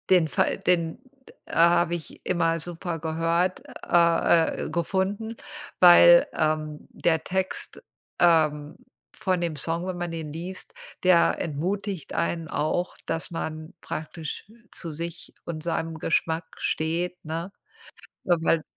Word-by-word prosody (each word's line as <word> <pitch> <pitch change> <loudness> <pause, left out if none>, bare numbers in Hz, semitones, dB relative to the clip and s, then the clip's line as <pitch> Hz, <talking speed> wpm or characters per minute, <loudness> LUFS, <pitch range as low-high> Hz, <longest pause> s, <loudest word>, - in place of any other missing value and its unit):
Den 180 -4 +5
Fall, 130 - +1
den 170 -2 +1 0.3
d - - -15
a 170 +1 +4
habe 175 0 +2
ich 165 - -9
immer 165 -2 +1
super 170 0 -4
gehört, 165 +3 0 0.2
a 170 -1 +4 0.2
äh, - - -4
gefunden, 190 +7 -1 0.4
weil, 175 -1 +8
ähm, 155 -1 -1
der 160 -2 0
Text, 190 +2 -3 0.4
ähm, 155 -3 +3 0.4
von 185 -1 0
dem 170 -2 -2
Song, 165 +4 -2
wenn 185 -1 -4
man 175 0 -3
den 160 -3 -6
liest, 180 +4 -6 0.3
der 180 -2 +4
entmutigt 185 +4 -3
einen 170 -1 -1
auch, 165 +3 -1
dass 165 0 -3
man 155 -1 -5
praktisch 160 +6 -6 0.2
zu 165 - -4
sich 170 +2 -6
und 155 -2 -5
seinem 165 -1 -2
Geschmack 165 0 0
steht, 170 +3 -2
ne? 165 +4 -4 0.7
Äh, 175 - +4
weil 165 -1 +2
170 Hz, 130 wpm, -26 LUFS, 160-175 Hz, 0.7 s, weil